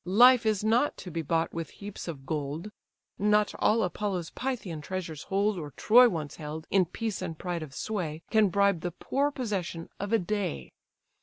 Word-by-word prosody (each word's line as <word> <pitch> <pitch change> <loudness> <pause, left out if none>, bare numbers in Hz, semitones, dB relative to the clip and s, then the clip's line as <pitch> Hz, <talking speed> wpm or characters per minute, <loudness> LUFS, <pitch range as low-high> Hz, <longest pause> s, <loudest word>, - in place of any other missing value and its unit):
Life 235 +5 +6
is 210 -2 +1
not 235 +6 +2
to 180 - -8
be 165 +1 -2
bought 165 +1 0
with 165 -1 -4
heaps 205 -2 -7
of 140 -5 -6
gold. 155 +6 -3 0.5
Not 210 +1 +3
all 220 +1 +3
Apollo's 180 -1 -2
Pythian 220 -12 -4
treasures 165 -3 -5
hold, 200 0 +1
Or 150 -3 -6
Troy 245 +3 +7
once 155 -6 -4
held, 155 0 -6
in 190 -2 +4
peace 215 +4 -4
and 165 -4 -4
pride 175 -1 -3
of 150 -3 -8
sway, 170 -7 -3
Can 215 -3 +5
bribe 200 -2 +2
the 175 - -2
poor 275 - 0
possession 195 -11 -3
of 200 +1 -3
a 225 - +5
day! 185 - -3
185 Hz, 180 wpm, -29 LUFS, 165-215 Hz, 0.5 s, Troy